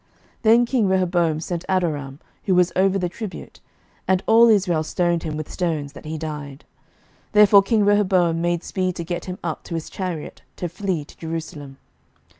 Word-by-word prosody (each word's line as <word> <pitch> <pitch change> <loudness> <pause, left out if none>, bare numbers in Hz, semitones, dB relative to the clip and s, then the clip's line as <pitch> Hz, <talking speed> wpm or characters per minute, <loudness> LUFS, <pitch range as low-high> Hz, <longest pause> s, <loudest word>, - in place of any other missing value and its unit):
11:012:018 - - -40 0.3
Then 235 +2 +5
king 235 -4 +1
Rehoboam 175 -4 +1
sent 170 +1 -4
Adoram, 150 -7 -1 0.3
who 190 - +2
was 180 0 +3
over 195 +1 +3
the 180 -2 -1
tribute; 200 +3 -8 0.5
and 190 0 +2
all 230 +1 +6
Israel 185 -7 +3
stoned 170 +1 0
him 155 -2 -4
with 155 - -5
stones, 155 -5 -2
that - - -12
he 155 +1 -4
died. 150 -3 -7 0.7
Therefore 210 -1 +7
king 210 +1 +1
Rehoboam 185 -5 +2
made 175 0 0
speed 185 -2 -2
to 170 - -4
get 175 0 -4
him 180 0 -6
up 165 -2 -3
to 170 - -5
his 165 - -5
chariot, 180 -5 -5
to 175 - -4
flee 175 -3 -3
to - - -17
Jerusalem. 160 -4 -6
175 Hz, 180 wpm, -22 LUFS, 160-190 Hz, 0.7 s, Therefore